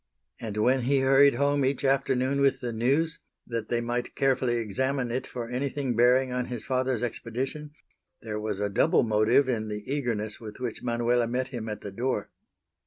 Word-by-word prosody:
And 110 Hz, -3 st, -5 dB
when 125 Hz, +5 st, +3 dB
he 135 Hz, +2 st, +2 dB
hurried 135 Hz, 0 st, +5 dB
home 140 Hz, +1 st, +2 dB
each 135 Hz, +1 st, 0 dB
afternoon 135 Hz, 0 st, +1 dB
with 135 Hz, -1 st, +3 dB
The 120 Hz, -2 st, -4 dB
News, 140 Hz, +8 st, +1 dB, 0.3 s
that 115 Hz, -2 st, -4 dB
they 120 Hz, -1 st, 0 dB
might 120 Hz, +1 st, -3 dB
carefully 130 Hz, -3 st, +1 dB
examine 125 Hz, +3 st, -1 dB
it 130 Hz, +2 st, -2 dB
for 120 Hz, -2 st, -5 dB
anything 130 Hz, +1 st, -2 dB
bearing 125 Hz, +2 st, +4 dB
on 125 Hz, 0 st, -1 dB
his 120 Hz, -3 st, -6 dB
father's 130 Hz, -2 st, 0 dB
expedition, 130 Hz, +5 st, -4 dB, 0.5 s
there 105 Hz, -2 st, -5 dB
was 105 Hz, -2 st, -3 dB
a 105 Hz, -, 0 dB
double 115 Hz, +11 st, +3 dB
motive 110 Hz, +4 st, +3 dB
in 110 Hz, -4 st, -1 dB
the 105 Hz, -1 st, -5 dB
eagerness 120 Hz, -7 st, -2 dB
with 105 Hz, 0 st, -9 dB
which 120 Hz, -3 st, -4 dB
Manuela 120 Hz, 0 st, +1 dB
met 125 Hz, +2 st, -2 dB
him 115 Hz, -4 st, -5 dB
at 105 Hz, -, -5 dB
the 100 Hz, -, -7 dB
door. 125 Hz, +6 st, -2 dB
125 Hz, 180 wpm, -27 LUFS, 115-135 Hz, 0.5 s, hurried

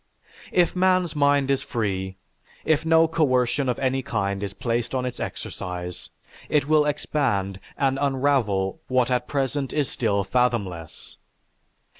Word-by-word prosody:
If 175 Hz, 0 st, +2 dB
man's 185 Hz, -2 st, +2 dB
mind 140 Hz, -1 st, +3 dB
is 135 Hz, -, +1 dB
free, 95 Hz, -5 st, -3 dB, 0.5 s
if 155 Hz, -1 st, +2 dB
no 160 Hz, 0 st, +5 dB
coercion 135 Hz, -4 st, +1 dB
of 125 Hz, -, 0 dB
any 135 Hz, 0 st, 0 dB
kind 100 Hz, -5 st, -2 dB
is 100 Hz, -2 st, -3 dB
placed 120 Hz, +4 st, -2 dB
on 130 Hz, -1 st, 0 dB
its 125 Hz, -, -5 dB
exercise, 90 Hz, -1 st, -6 dB, 0.4 s
it 145 Hz, -2 st, +2 dB
will 155 Hz, -1 st, +4 dB
expand 100 Hz, -10 st, -1 dB, 0.2 s
and 135 Hz, -1 st, +1 dB
unravel 130 Hz, -6 st, +1 dB
what 130 Hz, -2 st, +2 dB
at 125 Hz, -1 st, 0 dB
present 135 Hz, -1 st, -1 dB
is 145 Hz, -3 st, 0 dB
still 100 Hz, -4 st, 0 dB
fathomless. 100 Hz, -9 st, -2 dB
130 Hz, 135 wpm, -24 LUFS, 100-145 Hz, 0.5 s, no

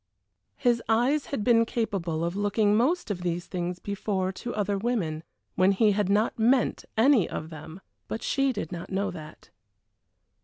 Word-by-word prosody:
His 240 Hz, -1 st, +2 dB
eyes 250 Hz, +7 st, +2 dB
had 250 Hz, -7 st, -3 dB
been 230 Hz, 0 st, +5 dB
capable 185 Hz, -9 st, -2 dB
of 170 Hz, +2 st, -3 dB
looking 205 Hz, +1 st, +2 dB
most 260 Hz, +3 st, +1 dB
of 180 Hz, -3 st, -4 dB
these 175 Hz, 0 st, -2 dB
things 180 Hz, -1 st, -3 dB
before 190 Hz, -1 st, -2 dB
to 240 Hz, +5 st, -6 dB
other 205 Hz, -1 st, 0 dB
women, 195 Hz, -8 st, -2 dB, 0.3 s
when 185 Hz, +2 st, +3 dB
he 210 Hz, +2 st, +4 dB
had 200 Hz, -1 st, 0 dB
not 210 Hz, +3 st, +1 dB
meant 245 Hz, +3 st, +2 dB
any 235 Hz, -3 st, +4 dB
of 160 Hz, +2 st, -6 dB
them, 160 Hz, +3 st, -10 dB, 0.3 s
but 220 Hz, -, -5 dB
she 275 Hz, -1 st, +1 dB
did 210 Hz, -9 st, -5 dB
not 170 Hz, -1 st, -6 dB
know 195 Hz, +1 st, -1 dB
that. 155 Hz, -3 st, -11 dB
205 Hz, 165 wpm, -27 LUFS, 180-230 Hz, 0.3 s, been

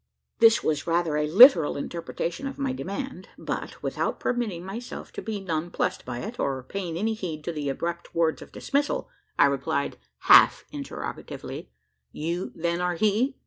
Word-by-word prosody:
This 225 Hz, 0 st, +6 dB
was 150 Hz, 0 st, -1 dB
rather 165 Hz, -2 st, +1 dB
a 150 Hz, 0 st, +1 dB
literal 180 Hz, -, +8 dB
interpretation 170 Hz, -, -4 dB
of 270 Hz, -, -6 dB
my 275 Hz, -2 st, -1 dB
demand; 225 Hz, -2 st, -5 dB
but, -, -, -5 dB
without -, -, -2 dB
permitting 215 Hz, -8 st, -2 dB
myself 225 Hz, +6 st, -7 dB
to -, -, -6 dB
be 220 Hz, -2 st, -4 dB
nonplussed 175 Hz, 0 st, -2 dB
by 120 Hz, -1 st, -5 dB
it, 230 Hz, +4 st, -7 dB
or 135 Hz, -2 st, -1 dB
paying 175 Hz, +2 st, -4 dB
any 220 Hz, +4 st, 0 dB
heed 170 Hz, -8 st, -5 dB
to 170 Hz, -, -3 dB
the 150 Hz, -3 st, -3 dB
abrupt 170 Hz, +5 st, -4 dB
words 165 Hz, -1 st, +1 dB
of -, -, -11 dB
dismissal, 285 Hz, +1 st, -1 dB, 0.3 s
I -, -, +7 dB
replied, 140 Hz, 0 st, -1 dB, 0.2 s
half -, -, +7 dB
interrogatively: -, -, -7 dB, 0.4 s
"You, 170 Hz, +4 st, -3 dB
then, 170 Hz, +1 st, -1 dB
are 180 Hz, 0 st, 0 dB
he? 220 Hz, -, +1 dB
175 Hz, 160 wpm, -26 LUFS, 160-220 Hz, 0.4 s, literal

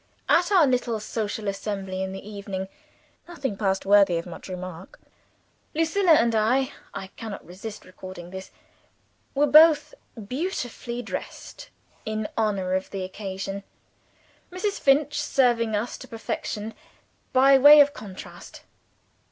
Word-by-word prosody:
At 350 Hz, +3 st, +3 dB
our 365 Hz, -6 st, +6 dB
little 245 Hz, -4 st, 0 dB
social 215 Hz, 0 st, -4 dB
assembly 195 Hz, -1 st, -3 dB
in 190 Hz, 0 st, -3 dB
the 195 Hz, +1 st, -8 dB
evening, 200 Hz, -2 st, -5 dB, 0.6 s
nothing 280 Hz, -11 st, -4 dB
passed 195 Hz, -2 st, -1 dB
worthy 200 Hz, -3 st, +5 dB
of 165 Hz, -, -4 dB
much 175 Hz, +1 st, -10 dB
remark. 185 Hz, -1 st, -8 dB, 0.8 s
Lucilla 330 Hz, +3 st, +3 dB
and 235 Hz, -6 st, +4 dB
I 250 Hz, +5 st, +2 dB, 0.2 s
(I 190 Hz, 0 st, -7 dB
cannot 220 Hz, -3 st, -7 dB
resist 200 Hz, +5 st, -9 dB
recording 185 Hz, -1 st, -10 dB
this) 190 Hz, 0 st, -8 dB, 0.9 s
were 285 Hz, +2 st, +4 dB
both 305 Hz, -, +6 dB, 0.3 s
beautifully 245 Hz, -, -4 dB
dressed, -, -, -7 dB, 0.3 s
in 215 Hz, -1 st, -3 dB
honor 200 Hz, -4 st, 0 dB
of 190 Hz, 0 st, -1 dB
the 195 Hz, -2 st, -4 dB
occasion; 195 Hz, +1 st, -5 dB, 0.9 s
Mrs. 395 Hz, +3 st, -2 dB
Finch 290 Hz, +1 st, +3 dB
serving 240 Hz, -6 st, +2 dB
us 220 Hz, +4 st, -3 dB
to -, -, -10 dB
perfection, 220 Hz, -1 st, -5 dB, 0.6 s
by 270 Hz, +1 st, +6 dB
way 295 Hz, +3 st, +9 dB
of 290 Hz, 0 st, +6 dB
contrast. 205 Hz, -7 st, -11 dB
215 Hz, 125 wpm, -25 LUFS, 195-270 Hz, 0.9 s, way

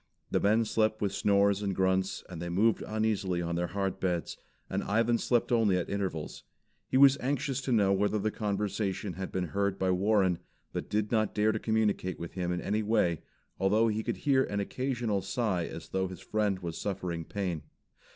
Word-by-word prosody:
The -, -, +2 dB
men 110 Hz, +3 st, +3 dB
slept 110 Hz, 0 st, +1 dB
with 100 Hz, -2 st, -1 dB
snores 100 Hz, 0 st, +3 dB
and 100 Hz, -2 st, -1 dB
grunts 95 Hz, 0 st, +1 dB
an 90 Hz, -3 st, -8 dB
they 85 Hz, +1 st, -4 dB
moved 105 Hz, +6 st, +2 dB
uneasily 105 Hz, -4 st, -1 dB
on 85 Hz, 0 st, -2 dB
their 85 Hz, +1 st, 0 dB
hard 95 Hz, 0 st, -2 dB
beds, 90 Hz, -3 st, -1 dB, 0.3 s
and -, -, -2 dB
Ivan 115 Hz, +2 st, +2 dB
slept 120 Hz, -1 st, +1 dB
only 110 Hz, -6 st, +3 dB
at 90 Hz, -, -3 dB
intervals. 95 Hz, -6 st, -3 dB, 0.5 s
He -, -, +2 dB
was 140 Hz, 0 st, +7 dB
anxious 135 Hz, 0 st, -1 dB
to 130 Hz, -, -3 dB
know 100 Hz, -4 st, +4 dB
whether 105 Hz, +2 st, +1 dB
the 105 Hz, +1 st, 0 dB
conversation 100 Hz, -2 st, -2 dB
had 95 Hz, +2 st, -5 dB
been 90 Hz, -3 st, -2 dB
heard 100 Hz, +1 st, 0 dB
by 95 Hz, -1 st, +1 dB
Warren, 95 Hz, -1 st, +2 dB, 0.3 s
but -, -, -4 dB
did 105 Hz, 0 st, 0 dB
not 110 Hz, -3 st, +1 dB
dare 105 Hz, +1 st, +3 dB
to 110 Hz, -, -2 dB
communicate 105 Hz, -5 st, 0 dB
with 85 Hz, -, -6 dB
him 90 Hz, -2 st, -2 dB
in 90 Hz, -, -2 dB
any 105 Hz, +2 st, 0 dB
way, 105 Hz, -7 st, +1 dB, 0.4 s
although 105 Hz, +4 st, +3 dB
he 110 Hz, 0 st, -1 dB
could -, -, -3 dB
hear 135 Hz, -2 st, +3 dB
an 100 Hz, -, -3 dB
occasional 120 Hz, -1 st, -1 dB
sigh 95 Hz, -3 st, -1 dB
as 80 Hz, -, -8 dB
though 95 Hz, 0 st, 0 dB
his 90 Hz, -2 st, -9 dB
friend 105 Hz, -3 st, 0 dB
was 85 Hz, -1 st, -4 dB
suffering 90 Hz, -4 st, -3 dB
pain. 90 Hz, -3 st, -3 dB
100 Hz, 195 wpm, -30 LUFS, 95-110 Hz, 0.5 s, was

